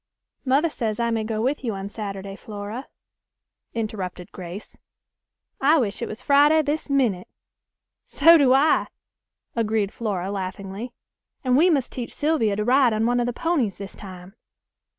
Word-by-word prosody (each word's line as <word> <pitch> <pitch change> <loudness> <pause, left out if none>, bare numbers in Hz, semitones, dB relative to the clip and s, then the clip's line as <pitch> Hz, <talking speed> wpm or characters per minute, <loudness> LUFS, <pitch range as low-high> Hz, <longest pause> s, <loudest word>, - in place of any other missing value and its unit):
"Mother 285 +5 +2
says 220 -4 -3
I 235 0 +1
may 225 -1 0
go 220 0 -2
with 275 +3 -1
you 225 -5 -2
on 195 0 -5
Saturday, 200 -2 -6
Flora," 210 +4 -7 0.9
interrupted 195 -5 -4
Grace; 180 +3 -9 0.9
"I 295 +4 +5
wish 210 -8 -1
it - - -2
was 225 +4 -8
Friday 295 +3 +5
this 300 +1 -2
minute." 240 -10 +1 0.8
"So 330 +4 +6
do 280 -5 +5
I," 275 +4 +4 0.7
agreed 220 -3 0
Flora 195 -4 -3
laughingly; 195 +4 -5 0.5
"and 255 -2 +2
we 330 +7 +5
must 275 -7 +1
teach 245 -2 -6
Sylvia 290 -9 +1
to 210 - -1
ride 255 -1 +4
on 215 +1 +1
one 245 +1 +2
of 240 - 0
the - - 0
ponies 265 - -1
this 195 -1 -8
time." 185 -1 -10
225 Hz, 155 wpm, -24 LUFS, 200-275 Hz, 0.9 s, So